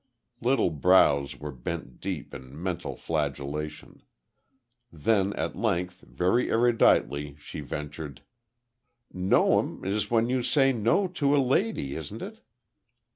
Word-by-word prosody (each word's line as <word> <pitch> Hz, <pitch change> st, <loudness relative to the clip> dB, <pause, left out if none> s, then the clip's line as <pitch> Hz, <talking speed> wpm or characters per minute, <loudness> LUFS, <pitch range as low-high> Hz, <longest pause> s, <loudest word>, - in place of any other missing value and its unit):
Little 120 Hz, -6 st, +2 dB
brows 75 Hz, -3 st, +4 dB
were 75 Hz, 0 st, -5 dB
bent 75 Hz, +6 st, -6 dB
deep 90 Hz, -7 st, -5 dB
in 65 Hz, +3 st, -10 dB
mental 90 Hz, 0 st, -3 dB
flagellation. 75 Hz, 0 st, -4 dB, 0.9 s
Then, 100 Hz, +5 st, +1 dB
at -, -, -3 dB
length, 90 Hz, +1 st, -1 dB
very 95 Hz, +8 st, 0 dB
eruditely, 75 Hz, -, +2 dB
she -, -, -9 dB
ventured: 75 Hz, -1 st, -6 dB, 0.9 s
"No'm 90 Hz, 0 st, +2 dB
is 100 Hz, +2 st, -1 dB
when 115 Hz, 0 st, +2 dB
you 130 Hz, +1 st, 0 dB
say 135 Hz, +2 st, +3 dB
no 120 Hz, -, +2 dB
to 145 Hz, -5 st, +1 dB
a -, -, +3 dB
lady, 135 Hz, -, +1 dB
isn't 80 Hz, -3 st, -6 dB
it?" -, -, -9 dB
90 Hz, 120 wpm, -27 LUFS, 75-120 Hz, 0.9 s, brows